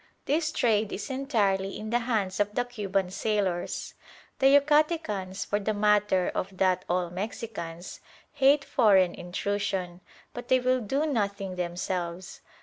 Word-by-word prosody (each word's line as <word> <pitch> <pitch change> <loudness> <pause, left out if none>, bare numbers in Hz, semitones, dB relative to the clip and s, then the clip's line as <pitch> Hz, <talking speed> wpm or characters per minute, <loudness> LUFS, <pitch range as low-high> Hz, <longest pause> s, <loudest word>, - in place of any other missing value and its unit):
This 310 +2 +1
trade 220 -5 +1
is 205 +7 -5
entirely 205 -8 0
in 215 +1 -6
the 240 - +3
hands 215 -6 -1
of 205 0 0
the 245 - +1
Cuban 195 -6 -2
sailors. 195 -4 -2 0.5
The 270 - +5
Yucatecans, 285 - +2
for 205 - 0
the 215 +1 -1
matter 205 -3 +2
of 190 0 -4
that 185 -1 +2
all 175 -1 0
Mexicans, 185 -3 -6 0.3
hate 275 +1 +3
foreign 195 -7 +4
intrusion, 185 -1 -3 0.3
but 245 0 -7
they 260 - +4
will 255 0 +1
do 270 +8 0
nothing 200 -8 -2
themselves. 175 0 -4
205 Hz, 140 wpm, -27 LUFS, 185-245 Hz, 0.5 s, The